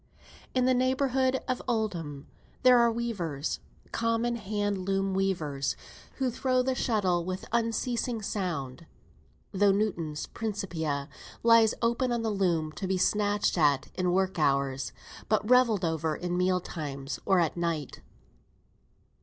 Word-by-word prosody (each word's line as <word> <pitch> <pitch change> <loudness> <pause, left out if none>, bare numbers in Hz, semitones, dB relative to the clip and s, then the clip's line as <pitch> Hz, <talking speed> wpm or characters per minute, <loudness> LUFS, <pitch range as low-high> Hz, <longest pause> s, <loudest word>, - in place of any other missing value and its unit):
In 255 -1 +3
the 255 - +4
neighbourhood 260 0 +1
of 255 - -1
Oldham 175 - -2 0.4
there 250 -1 +7
are 235 0 +4
weavers, 185 -11 -3 0.3
common 230 +1 0
hand 205 -2 -2
loom 195 +1 0
weavers, 160 -8 -1 0.4
who 260 -2 0
throw 255 +1 +1
the 260 +1 +1
shuttle 200 -8 +1
with 185 +2 -4
unceasing 235 +1 0
sound, 170 -7 -3 0.6
though 200 +1 +4
Newton's 175 -7 -1
"Principia" 170 -10 -3 0.4
lie 230 -1 +7 0.2
open 235 +2 +1
on 235 -1 0
the 220 - 0
loom, 170 -6 0
to 190 +4 -5
be 190 0 +1
snatched 205 0 +1
at 145 -3 +3
in 180 -1 0
work 190 -1 +1
hours, 135 -2 +1 0.4
but 215 0 +1
revelled 235 -6 +4
over 160 -1 -1
in 175 +2 -3
meal 180 0 +2
times, 140 -5 -5
or 190 -2 +3
at 165 -3 +1
night. 165 -5 -3
195 Hz, 135 wpm, -29 LUFS, 165-230 Hz, 0.6 s, there